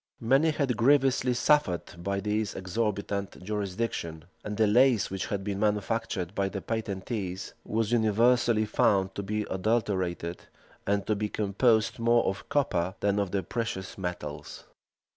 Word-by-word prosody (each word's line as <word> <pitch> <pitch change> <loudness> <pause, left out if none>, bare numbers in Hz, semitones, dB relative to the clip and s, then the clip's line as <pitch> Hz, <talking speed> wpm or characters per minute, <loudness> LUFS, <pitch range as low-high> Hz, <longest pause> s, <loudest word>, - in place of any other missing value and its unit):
Many 135 +7 +3
had 140 -6 0
grievously 130 0 +3
suffered 105 - +1
by 100 +1 -1
this 105 0 -1
exorbitant 100 0 -3
jurisdiction; 95 -5 -3 0.2
and 105 0 -5
the 110 - +4
lace 115 -1 +4
which 95 -1 -3
had 100 -1 -3
been 100 -1 -3
manufactured 105 -3 -1
by 100 -1 0
the 100 - -4
patentees 100 -3 -4
was 110 0 -1
universally 115 0 +3
found 95 -2 +2
to 100 - -4
be 105 +2 -2
adulterated, 95 -4 -1 0.5
and 100 0 +1
to 105 - +1
be 105 +1 -2
composed 110 +3 +1
more 115 0 +3
of 95 +1 -3
copper 95 -11 0
than 100 0 +2
of 100 -2 0
the 95 0 -1
precious 115 -5 -4
metals. 90 -6 -6
105 Hz, 140 wpm, -28 LUFS, 95-115 Hz, 0.5 s, the